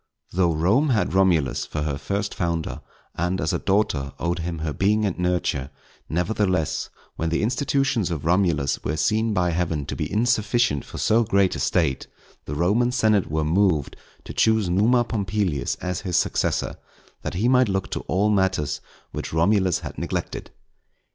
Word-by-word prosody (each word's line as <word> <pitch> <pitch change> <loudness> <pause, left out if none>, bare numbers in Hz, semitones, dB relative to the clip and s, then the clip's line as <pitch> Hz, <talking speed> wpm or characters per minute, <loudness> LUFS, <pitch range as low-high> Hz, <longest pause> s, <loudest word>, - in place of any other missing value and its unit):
_ - - -11
Though 90 -2 +3
Rome 105 - +2
had 110 -8 +1
Romulus 90 -8 +2
for 75 - -3
her 70 -2 -2
first 100 +8 -2
founder, 85 -2 -2 0.3
and 90 +3 -1
as 75 - 0
a - - 0
daughter 80 -9 0
owed 85 +1 -1
him 85 0 -3
her 80 -1 -3
being 105 +5 +2
and 95 - -1
nurture, 90 -7 0 0.4
nevertheless, 90 -1 0 0.3
when 80 - -1
the 85 +5 0
institutions 130 -3 +1
of 80 -3 -4
Romulus 85 -6 +1
were 75 +3 -2
seen 110 +5 +1
by 90 -4 +1
Heaven 80 -4 -1
to - - -5
be - - -3
insufficient 110 - +1
for - - -9
so 115 +2 +3
great 100 -4 +2
a - - -4
State, 80 -7 0 0.4
the 75 - -5
Roman 105 +10 +2
senate 110 -5 +2
were 75 0 0
moved 85 -3 +1 0.3
to - - -8
choose 110 -5 +2
Numa 115 +7 +4
Pompilius 100 - -1
as 90 0 -3
his 90 -4 -1
successor, - - 0 0.4
that - - -5
he 105 +7 +1
might 125 -2 +4
look 95 -1 -2
to - - -2
all 100 +4 +2
matters 95 -7 0 0.3
which - - -5
Romulus 95 +2 +2
had - - -7
neglected. - - -4
95 Hz, 170 wpm, -24 LUFS, 80-105 Hz, 0.4 s, Numa